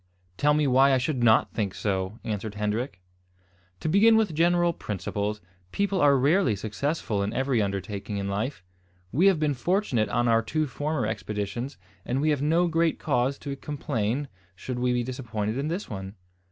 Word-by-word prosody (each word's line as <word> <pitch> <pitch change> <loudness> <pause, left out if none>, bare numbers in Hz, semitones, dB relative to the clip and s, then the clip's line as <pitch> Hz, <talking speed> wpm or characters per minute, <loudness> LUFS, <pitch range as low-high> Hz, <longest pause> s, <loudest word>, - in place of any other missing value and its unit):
"Tell 150 +7 +3
me 150 0 +2
why 135 +1 +5
I - - +4
should 130 0 -1
not 110 -2 +4
think 100 -4 -2
so," 95 0 -2
answered 105 0 -4
Hendrik. 105 +1 -2 0.8
"To - - -2
begin 215 +7 +5
with 215 -7 +1
general 175 +2 +3
principles, 105 - -3 0.3
people 200 -2 0
are 140 -1 +5
rarely 145 - +3
successful 110 - -2
in 100 +1 -1
every 130 -3 +1
undertaking 100 +1 -3
in 100 0 -2
life. 105 +2 -3 0.5
We 170 +9 +4
have 190 -5 +4
been 150 -2 +1
fortunate 135 - 0
on 120 +3 +1
our 115 -1 +4
two 155 +7 -1
former 145 -1 -2
expeditions, 105 +4 -4 0.3
and 125 +2 -1
we 155 +2 +2
have 145 -2 0
no 165 +4 +3
great 165 -1 +1
cause 135 -1 0
to 140 -1 -3
complain 140 -3 -2 0.3
should 125 +6 -5
we 125 0 +1
be 120 0 +1
disappointed 115 -4 -3
in 140 - -1
this 175 +6 -3
one. 95 -1 -7
125 Hz, 175 wpm, -26 LUFS, 105-150 Hz, 0.8 s, why